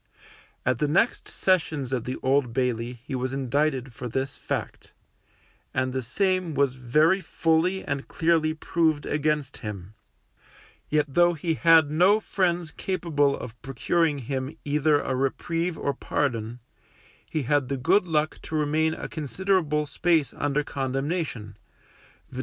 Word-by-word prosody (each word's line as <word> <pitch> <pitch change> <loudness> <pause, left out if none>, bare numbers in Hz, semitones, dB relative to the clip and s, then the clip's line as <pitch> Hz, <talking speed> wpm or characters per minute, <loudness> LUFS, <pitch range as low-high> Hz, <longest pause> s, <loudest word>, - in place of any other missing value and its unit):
At 125 -1 +1
the 150 - +2
next 190 +11 +1
sessions 160 -8 0
at 125 -3 -1
the 130 - -3
Old 130 -2 +2
Bailey 120 -2 -1
he 135 - -7
was 130 0 -2
indicted 135 -1 0
for 125 - -6
this 130 +3 -2
fact, - - -5 0.8
and 130 0 0
the 130 - -1
same 185 - 0
was 140 -2 +2
very 150 +9 +2
fully 165 +3 +1
and 140 -1 -3
clearly 160 -1 +1
proved 160 -2 0
against 150 -2 -1
him; 105 -3 -7 1.0
yet 150 0 +2
though 175 +5 +3
he 165 +1 -1
had 160 -2 +5
no 185 +7 +5
friends 175 -5 -1
capable 155 -7 0
of 120 -2 -9
procuring 150 +4 0
him 135 +3 -4
either 150 +1 +3
a 135 - -2
reprieve 165 +6 -1
or 140 - -1
pardon, 120 -6 -2 0.7
he 155 - -1
had 140 0 +1
the 140 - -1
good 180 +9 +3
luck 155 -1 0
to 160 - -6
remain 155 +1 +1
a - - -6
considerable 155 -1 0
space 160 0 +1
under 145 +1 0
condemnation, 135 - -3 0.7
viz. 130 - -7
145 Hz, 140 wpm, -26 LUFS, 130-165 Hz, 1.0 s, had